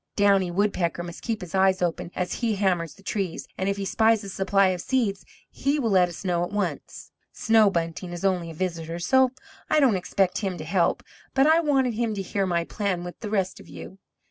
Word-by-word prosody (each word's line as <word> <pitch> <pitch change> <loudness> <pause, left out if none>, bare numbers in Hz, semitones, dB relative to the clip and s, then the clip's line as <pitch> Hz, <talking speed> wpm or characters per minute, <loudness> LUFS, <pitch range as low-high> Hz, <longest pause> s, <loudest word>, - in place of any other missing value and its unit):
Downy 200 -3 +3
Woodpecker 175 -2 0
must 170 -1 -8
keep 220 -2 -3
his 180 -3 -8
eyes 190 0 +3
open 170 -1 -2
as 180 -1 -2
he 225 -3 +1
hammers 180 -5 0
the 200 - -19
trees, 195 -3 -3
and 190 +1 -1
if 200 - -1
he 200 - -3
spies 220 +2 +2
a 200 - -7
supply 195 0 +2
of 180 -2 -2
seeds 220 -6 0 0.2
he 280 +2 -1
will 235 -7 0
let 180 -2 +4
us 175 +3 -9
know 175 -2 +1
at 175 - -3
once. 205 0 -4 0.2
Snow 225 -2 +4
Bunting 170 -1 -3
is 175 +2 -5
only 180 -3 0
a 165 - -9
visitor, 170 -1 -3
so 260 +10 +3 0.4
I - - +4
don't 260 -8 +4
expect 185 0 0
him 190 -4 -3
to 155 - -6
help, 170 +1 +1 0.3
but 270 0 +5
I 320 +2 +5
wanted 270 -6 +2
him 225 -1 -1
to 195 - -3
hear 195 +1 -1
my 170 -2 +1
plan 185 -1 -2
with 175 0 -8
the 210 - -5
rest 195 -3 -1
of - - -14
you. 190 - -10
195 Hz, 220 wpm, -25 LUFS, 175-215 Hz, 0.4 s, but